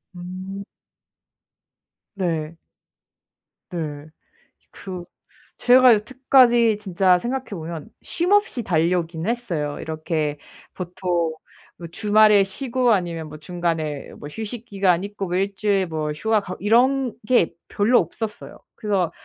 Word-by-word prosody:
음. 185 +2 -7 1.5
네. 165 -4 -2 1.1
네. 155 -4 -5 0.6
그 185 -2 -8 0.5
제가 250 0 +7
여태까지 240 -1 +4
진짜 185 -2 +3
생각해 260 +5 -3
보면 165 -4 -6
쉼 345 +3 -2
없이 410 - +2
달려오긴 170 -1 0
했어요. 175 -12 -2
이렇게 155 -1 -2 0.4
보통 175 -2 -2 0.4
뭐 170 - -8
주말에 210 +3 +4
쉬고 245 +5 0
아니면 170 -6 -1
뭐 155 - -9
중간에 160 -2 -3
뭐 - - -8
휴식 225 +6 -6
기간 195 -5 +1
있고 200 -1 -5
뭐 175 - -2
1 195 +1 -1
주일 200 -2 +1
뭐 155 -2 -3
휴가 215 +8 +1
가고 185 -2 -7
이런 245 +4 +3
게 230 -10 +3
별로 225 +5 +3
없었어요. 210 +6 -5 0.2
그래서 200 -6 0
190 Hz, 225 characters per minute, -22 LUFS, 165-225 Hz, 1.5 s, 제가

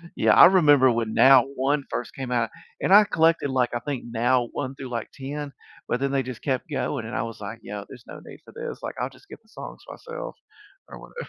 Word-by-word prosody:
Yeah. - - +3
I - - +9
remember 145 -8 +5
when 115 -2 -2
Now 130 -2 +7
1 140 +2 0
first 120 - -5
came 130 -2 -6
out, 115 -2 0 0.3
and 190 - +2
I 210 +1 +9
collected, 165 -5 +2
like, 130 -2 0
I 120 - -1
think 140 0 -5
Now 120 +1 +1
1 135 -1 -4
through, 135 -2 -8
like, 115 -2 -4
10, 145 +1 -6 0.4
but 125 - -1
then 140 0 -1
they 135 -1 0
just 130 -2 -8
kept 130 +2 -2
going, 140 -5 -3
and 115 - -6
I - - -1
was, 115 -2 -7
like, 110 +3 -7
"Yeah. 100 0 -6
There's 125 -2 -13
no - - -10
need - - -12
for - - -15
this. 470 0 -6
Like, - - -5
I'll - - -2
just 395 - -21
get - - -12
the 220 - -29
songs - - -10
myself 475 +1 -8 0.5
or - - -10
whatever." 480 - -9
130 Hz, 240 wpm, -24 LUFS, 120-145 Hz, 0.5 s, I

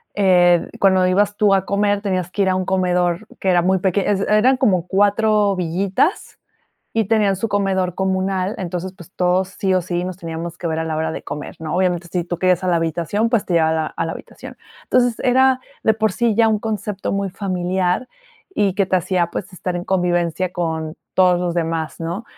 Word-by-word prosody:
eh, 180 -3 +4
cuando 190 -2 +4
ibas 205 +2 +1
tú 205 -3 +4
a 195 0 +2
comer 205 0 +1
tenías 185 -3 -2
que 205 - -2
ir 190 - +3
a 185 - +1
un 185 -1 -1
comedor 180 0 0
que 190 - 0
era 175 -1 +4
muy 190 +2 +2
peque 190 +1 +1
es 200 -1 +1
eran 240 +5 +4
como 185 -9 +2
4 205 0 +2
villitas, 185 - -1 0.6
y 225 -1 +2
tenían 210 -3 +2
su 225 +4 -2
comedor 190 -3 0
comunal. 190 +1 -1
Entonces, 180 0 -4
pues, 185 -2 -15
todos 180 +1 +1
sí 190 -1 +1
o 185 - +3
sí 175 0 -3
nos 185 0 -6
teníamos 165 0 -6
que 175 - -4
ver 160 0 -1
a 160 - -1
la 160 -1 -3
hora 160 0 -1
de - - -6
comer, 150 - -7
¿no? 160 0 -4
Obviamente, 180 -2 0
si 180 -2 0
tú 175 0 -4
querías 185 -1 +2
a - - -1
la 175 - +3
habitación, 170 +7 -1
pues, 230 -4 +1
te 175 - -1
llega 160 -1 +4
a - - +1
la 160 -1 0
a 165 - -4
la - - -3
habitación. - - -11 0.3
Entonces 245 -2 +2
era 260 0 +3 0.2
de 220 - +4
por 215 -2 0
sí 235 -1 +1
ya 225 0 +4
un 215 - +1
concepto 210 -3 -3
muy 195 -1 -1
familiar 185 +3 -1 0.5
y 200 -3 +1
que 200 0 +2
te 185 - +2
hacía, 175 -1 0
pues, 190 +3 -5
estar 180 +1 -4
en 175 - -5
convivencia 175 -1 0
con 160 -2 -3 0.2
todos 180 -1 +4
los 175 -1 -2
demás, 165 -2 -2
¿no? 170 +7 -4
185 Hz, 215 wpm, -20 LUFS, 175-205 Hz, 0.6 s, eh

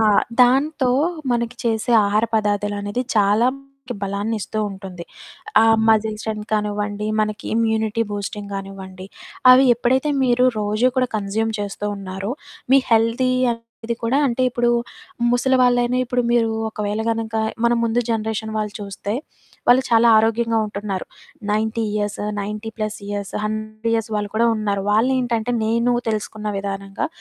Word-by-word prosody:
ఆ! - - +4 0.4
దాంతో 265 +1 +2 0.4
మనకి 235 0 -2
చేసే 225 +1 0
ఆహార 210 +2 +2
పదార్థాలు 205 -1 0
అనేది 205 +5 -2
చాలా 210 +3 +4 0.4
మనకి 245 - -3
బలాన్ని 200 +3 -2
ఇస్తూ 215 - -4
ఉంటుంది. 190 -3 -8 0.6
ఆ - - +5 0.3
మసిల్ 220 -1 +3
స్ట్రెంగ్త్ 215 -1 -5
కానివ్వండి, 210 0 -1
మనకి 215 +1 -2
ఇమ్యూనిటీ 220 -1 +1
బూస్టింగానివ్వండి 195 -2 -6 0.4
అవి 255 +1 +8
ఎప్పుడైతే 260 +4 +1 0.2
మీరు 250 0 +3 0.2
రోజూ 215 +4 +1
కూడా 255 -1 +3
కన్జ్యూమ్ 215 +2 -1
చేస్తూ 205 0 -4
ఉన్నారో, 195 +1 -5 0.4
మీ 270 - +7
హెల్తీ 230 +3 +3 0.2
అనేది 230 0 -7
కూడా, 235 +4 +2
అంటే 255 0 0
ఇప్పుడు 240 -1 +1 0.6
ముసలివాళ్ళైనా, 245 -1 +3
ఇప్పుడు 245 0 0
మీరు 230 -2 +3 0.2
ఒకవేళ 210 0 -3
గనుక 225 -1 -3 0.3
మన 235 - +3
ముందు 230 +1 +1
జనరేషన్ 220 -1 -2
వాళ్ళు 210 -1 -3
చూస్తే, 200 +1 -5 0.5
వాళ్ళు 250 +2 +6
చాలా 230 0 +5
ఆరోగ్యంగా 225 +1 +1
ఉంటున్నారు. 200 -2 -4 0.5
90 220 +1 0
ఇయర్స్, 205 -1 -2 0.2
90+ 215 +1 -4
ఇయర్స్, 205 -1 -4
100 215 +1 -3
ఇయర్స్ 225 -1 -2
వాళ్ళు 205 -1 -3
కూడా 235 +1 +4
ఉన్నారు. 200 -2 -1
వాళ్ళేంటంటే, 240 0 +1
నేనూ 235 +2 +2 0.2
తెలుసుకున్న 215 0 -4
విధానంగా 195 0 -4
220 Hz, 130 wpm, -21 LUFS, 205-235 Hz, 0.6 s, అవి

